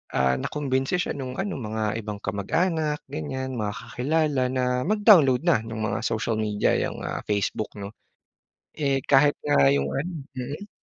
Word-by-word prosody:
ah, 65 Hz, -1 st, +3 dB
nakumbinsi 135 Hz, 0 st, -1 dB
siya 180 Hz, -, -1 dB
nung 130 Hz, -3 st, -5 dB
ano 195 Hz, -5 st, -3 dB
mga 110 Hz, -1 st, -2 dB
ibang 105 Hz, -1 st, -6 dB
kamag-anak 150 Hz, -, -1 dB
ganyan, 130 Hz, -4 st, -4 dB
mga 105 Hz, 0 st, -2 dB
kakilala 140 Hz, +1 st, 0 dB
na 130 Hz, 0 st, -1 dB, 0.2 s
mag-download 190 Hz, -, +5 dB
na 170 Hz, -8 st, +4 dB
nung 110 Hz, -1 st, -4 dB
mga 110 Hz, -, -1 dB
social 110 Hz, 0 st, -1 dB
media, 105 Hz, -1 st, +1 dB
yung -, -, -3 dB
ah -, -, -3 dB
Facebook' 105 Hz, +1 st, -1 dB
no. 100 Hz, -1 st, -7 dB, 0.9 s
Eh 140 Hz, -3 st, +1 dB
kahit 145 Hz, +1 st, +6 dB
nga 70 Hz, -, +5 dB
yung 70 Hz, 0 st, 0 dB
ano 165 Hz, +2 st, -4 dB, 0.2 s
mm. 145 Hz, +11 st, -5 dB
130 Hz, 155 wpm, -25 LUFS, 110-150 Hz, 0.9 s, kahit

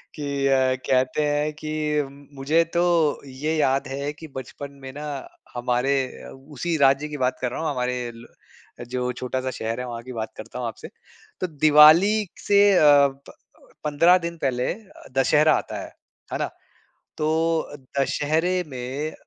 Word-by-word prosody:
कि 140 Hz, -2 st, -1 dB
अ, 130 Hz, -1 st, +3 dB
कहते 130 Hz, +3 st, +2 dB
हैं 150 Hz, +1 st, 0 dB
कि 155 Hz, 0 st, -6 dB, 0.7 s
मुझे 155 Hz, +5 st, +3 dB
तो 170 Hz, -, +2 dB, 0.5 s
ये 150 Hz, +5 st, -3 dB
याद 135 Hz, -2 st, +1 dB
है 140 Hz, +2 st, -3 dB
कि 160 Hz, +2 st, -11 dB
बचपन 140 Hz, +2 st, -7 dB
में 135 Hz, 0 st, -8 dB
ना 150 Hz, +1 st, -7 dB, 0.5 s
हमारे 125 Hz, +2 st, 0 dB, 0.3 s
अ, -, -, -10 dB
उसी 145 Hz, +5 st, -4 dB
राज्य 140 Hz, +1 st, +3 dB
की 150 Hz, -1 st, -6 dB
बात 125 Hz, -1 st, 0 dB
कर 125 Hz, -1 st, -1 dB
रहा -, -, -4 dB
हूँ 160 Hz, -, -1 dB
हमारे 125 Hz, -2 st, -2 dB
ल 115 Hz, +1 st, -12 dB, 0.6 s
जो 125 Hz, 0 st, -1 dB
छोटा-सा 130 Hz, +1 st, -3 dB
शहर 115 Hz, 0 st, -4 dB
है 125 Hz, -, -3 dB
वहाँ 120 Hz, -1 st, -6 dB
की 130 Hz, -, -9 dB
बात 110 Hz, -2 st, -4 dB
करता 110 Hz, +3 st, -8 dB
हूँ 120 Hz, -, -2 dB
आपसे। 110 Hz, -, -8 dB, 0.5 s
तो 185 Hz, -, 0 dB
दिवाली 155 Hz, +7 st, +6 dB, 0.2 s
से 200 Hz, 0 st, +4 dB
अ, 180 Hz, -, +4 dB
प 140 Hz, -2 st, +4 dB
अ, -, -, -21 dB, 0.2 s
15 165 Hz, +5 st, +5 dB
दिन 170 Hz, -1 st, -5 dB
पहले 130 Hz, -4 st, -1 dB
अ, 210 Hz, -1 st, -16 dB
दशहरा 150 Hz, +3 st, +4 dB
आता -, -, -4 dB
है। -, -, -8 dB, 0.5 s
है -, -, 0 dB
ना? -, -, -1 dB, 0.7 s
तो 155 Hz, -, 0 dB, 0.7 s
दशहरे 155 Hz, +6 st, +1 dB
में 135 Hz, +3 st, -5 dB
140 Hz, 165 wpm, -24 LUFS, 130-155 Hz, 0.7 s, दिवाली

